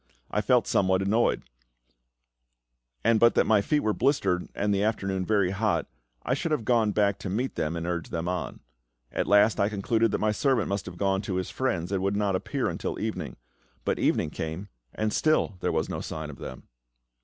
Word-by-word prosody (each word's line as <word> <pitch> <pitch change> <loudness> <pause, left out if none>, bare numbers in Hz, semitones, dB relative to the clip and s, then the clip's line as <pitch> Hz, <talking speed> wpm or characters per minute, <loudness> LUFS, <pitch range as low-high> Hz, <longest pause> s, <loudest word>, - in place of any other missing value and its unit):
I - - +1
felt - - +3
somewhat 95 0 +2
annoyed; 110 +4 +2 1.6
and 115 0 +4
but 115 +1 +5
that - - +4
my 110 -2 +4
feet 150 +8 +1
were 110 - +1
blistered, 100 -10 +1
and 105 0 +1
the 100 - +1
afternoon 95 -3 -1
very 100 -4 +2
hot, 105 +2 0 0.4
I 125 - 0
should 155 +4 -2
have 145 -8 0
gone 115 -3 +3
back 100 -1 +1
to 95 - -5
meet 120 +8 -1
them 80 +2 -2
and 85 0 -3
urge 85 -1 -3
them 85 0 -3
on. 90 0 -3 0.5
At - - -1
last 105 +2 +5
I 100 - +3
concluded 110 +2 +1
that - - 0
my 110 0 +1
servant 125 0 +1
must 100 0 -2
have 90 -1 -8
gone 95 0 +1
to 100 -2 -3
his 90 0 -2
friend's, 95 -9 -1
and 95 -2 0
would 100 +1 0
not 100 -2 +1
appear 95 - -1
until - - -3
evening. - - -4 0.5
But - - 0
evening 75 - +1
came, 80 +7 -5 0.3
and 110 0 -1
still 155 -10 +2
there - - 0
was - - 0
no - - -4
sign 80 -1 -5
of 70 - -13
them. 65 - -8
100 Hz, 200 wpm, -27 LUFS, 95-110 Hz, 1.6 s, but